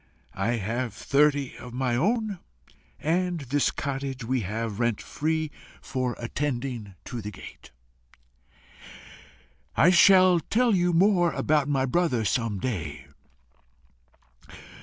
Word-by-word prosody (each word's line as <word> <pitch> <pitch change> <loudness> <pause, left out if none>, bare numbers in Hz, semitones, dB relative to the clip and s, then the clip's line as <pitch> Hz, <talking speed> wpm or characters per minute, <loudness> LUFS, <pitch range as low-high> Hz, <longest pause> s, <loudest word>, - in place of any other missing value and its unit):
I 100 +5 -1
have 115 +1 -3
thirty 140 +2 +1
of 125 -1 -10
my 125 -2 0
own, 210 - 0 0.6
and 175 +1 0
this 140 +1 +1
cottage 135 -2 -4
we 130 +2 0
have 110 +1 -4
rent 120 -2 +1
free 155 0 -2 0.3
for 130 -2 -3
attending 120 -5 -4
to 120 - -5
the 105 - -5
gate. 105 - -12 2.1
I 170 +6 +6
shall 185 -1 +6
tell 235 +6 +1
you 180 -2 +2
more 175 -1 +3
about 150 -2 +1
my 135 -2 +1
brother 135 -6 +1
some 115 -3 0
day. 80 - -4
135 Hz, 115 wpm, -26 LUFS, 120-165 Hz, 2.1 s, I